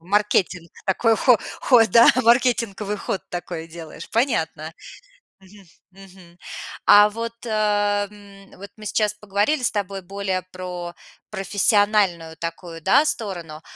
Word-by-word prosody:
Маркетинг. 185 -2 0 0.2
Такой 225 +4 +2
хо 245 -1 +4 0.2
ход, 225 -6 +4
да, 235 +3 +7
маркетинговый 230 -4 +1
ход 195 - -4
такой 175 -2 -6
делаешь. 165 -1 -10
Понятно. 165 - -1 0.7
Мгм. 195 +1 -18 0.3
Мгм. 185 -2 -17 0.5
А 205 +1 +7
вот, 230 +2 -5
ам, 205 -2 +1 0.5
вот 200 +1 -10
мы 215 - -11
сейчас 210 0 0
поговорили 210 +7 -1
с - - +2
тобой 200 -2 -4
более 190 0 -3
про 180 -1 -7 0.4
профессиональную 200 -4 +1
такую, 165 0 -7
да, 280 - +4
сторону. 175 - -4
200 Hz, 120 wpm, -22 LUFS, 180-215 Hz, 0.7 s, да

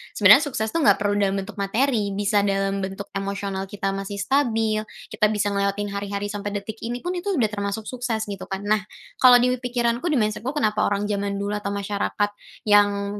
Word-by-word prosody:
sebenarnya - - +7
sukses 220 -5 -2
tuh 330 - 0
nggak 290 - +5
perlu 205 0 0
dalam 195 -1 +1
bentuk 200 +2 -5
materi, 210 -1 0
bisa 205 +1 +2
dalam 195 0 0
bentuk 195 +1 -5
emosional 195 -1 -3
kita 195 0 -3
masih 195 +1 -5
stabil, 220 -1 0 0.2
kita 210 - +2
bisa 210 -1 0
ngelewatin 200 +1 -1
hari-hari 200 0 -3
sampai 205 0 -4
detik 220 +2 -8
ini 240 +2 -5
pun 355 - -2
itu 365 +2 -5
udah 225 -8 +1
termasuk 200 +1 -3
sukses 240 -2 -3
gitu 200 -2 -7
kan. 195 +1 -5
Nah, 210 +1 +2 0.4
kalau 255 -1 +8
di 245 +1 +4
wi 250 - -2
pikiranku 245 +3 -1
di 305 - +1
mindset-ku 225 +5 -1
kenapa 215 -6 +1
orang 205 0 0
zaman 200 0 -1
dulu 200 +1 -3
atau 200 0 -4
masyarakat 205 0 -1 0.3
yang, 205 -1 +3
205 Hz, 195 wpm, -23 LUFS, 200-225 Hz, 0.4 s, kalau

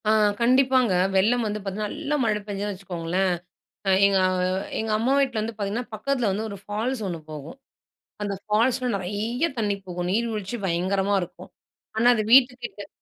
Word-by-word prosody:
ஆ - - +6 0.3
கண்டிப்பாங்க. 255 -2 +4 0.2
வெள்ளம் 230 +6 +3
வந்து 210 0 -3
பார்த்தீங்கன்னா, 205 +2 -3
நல்ல 300 -1 -2
மழை 215 -2 +1
பெஞ்சதுன்னு 205 0 -3
வச்சுக்கோங்களேன்! 180 0 -1 0.5
அ - - +4 0.2
எங்க 200 -1 +4
அ - - +1 0.5
எங்க 220 0 -2
அம்மா 240 +5 +1
வீட்ல 255 -6 +1
வந்து 225 +2 -3
பார்த்தீங்கன்னா, 225 +4 -3
பக்கத்தில 245 +1 0
வந்து 215 +3 -2
ஒரு 200 - -7
ஃபால்ஸ் 220 +4 -2
ஒண்ணு 170 -3 -4
போகும். 155 - -8 0.7
அந்த 205 -1 -2
ஃபால்ஸ்ல 245 +4 +1
நெறைய 215 - -1
தண்ணீ 205 -2 0
போகும். 180 -1 -3
நீர்வீழ்ச்சி 225 0 -2
பயங்கரமா 190 +3 +1
இருக்கும், 175 - -9 0.5
ஆனா 225 +2 +2
அது 215 - +1
வீட்டுக்கிட்ட 245 -5 +3
210 Hz, 155 wpm, -25 LUFS, 195-240 Hz, 0.7 s, ஆ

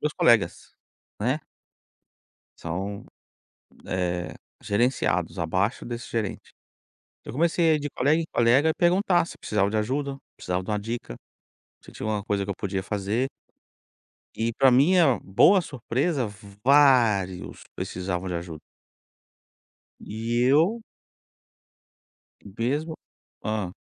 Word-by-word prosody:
meus 150 0 -1
colegas, 110 -8 +2 0.5
né. 130 +8 0 1.2
São, 95 +4 -5 0.8
eh, 90 -1 -2 0.3
gerenciados 120 +5 0
abaixo 95 +7 0
desse 120 0 -6
gerente. 110 -4 -4 0.7
Eu - - -8
comecei 165 +2 +2
a - - +5
ir 150 - -1
de 145 0 -4
colega 150 +6 +2
em - - -4
colega 125 +7 +4
e 160 - +2
perguntar 175 0 +3
se - - -11
precisava 100 -2 0
de 110 - -1
ajuda, 140 +6 -1
se 135 - -17
precisava 90 +1 -2
de 95 - -9
uma 105 - 0
dica, 115 - -5 0.7
se - - -14
tinha - - -7
alguma 105 -2 -1
coisa 100 -1 -1
que 100 - -5
eu 100 - -2
podia 95 -1 -3
fazer. 105 +6 -2 1.1
E 115 +1 -1
pra 135 +3 +4
minha 145 +1 +4
boa 175 - +5
surpresa, 130 -1 -1 0.4
vários 120 -10 +3
precisavam 90 0 -4
de 90 - -3
ajuda. 85 -2 -6 1.4
E 115 +3 -2
eu 165 - +3 1.6
mesmo, 130 - -2 0.5
hã? 105 -4 -3
115 Hz, 125 wpm, -25 LUFS, 100-145 Hz, 1.6 s, a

